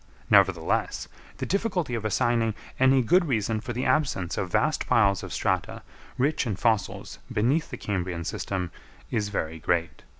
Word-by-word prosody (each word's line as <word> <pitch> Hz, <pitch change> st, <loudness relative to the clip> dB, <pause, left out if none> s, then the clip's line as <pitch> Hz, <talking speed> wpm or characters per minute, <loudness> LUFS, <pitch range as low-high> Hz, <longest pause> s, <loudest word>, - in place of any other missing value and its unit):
Nevertheless, 95 Hz, -5 st, +3 dB, 0.3 s
the -, -, -3 dB
difficulty 185 Hz, -, -1 dB
of 115 Hz, -2 st, -2 dB
assigning 115 Hz, +1 st, +1 dB, 0.2 s
any 130 Hz, 0 st, +5 dB
good 175 Hz, +10 st, +4 dB
reason 110 Hz, -4 st, 0 dB
for 120 Hz, -, -5 dB
the 125 Hz, +2 st, -2 dB
absence 95 Hz, -, +1 dB
of 90 Hz, -2 st, -3 dB
vast 155 Hz, -, +1 dB
piles 100 Hz, -4 st, +3 dB
of -, -, -8 dB
strata -, -, -1 dB, 0.3 s
rich 140 Hz, 0 st, +1 dB
in 105 Hz, -, -1 dB
fossils 110 Hz, +2 st, -1 dB
beneath 130 Hz, +9 st, +1 dB
the -, -, -6 dB
Cambrian 90 Hz, -4 st, -3 dB
system 90 Hz, 0 st, -3 dB, 0.4 s
is 105 Hz, -2 st, 0 dB
very 80 Hz, -5 st, -3 dB
great. 85 Hz, +1 st, -1 dB
110 Hz, 155 wpm, -26 LUFS, 95-130 Hz, 0.4 s, any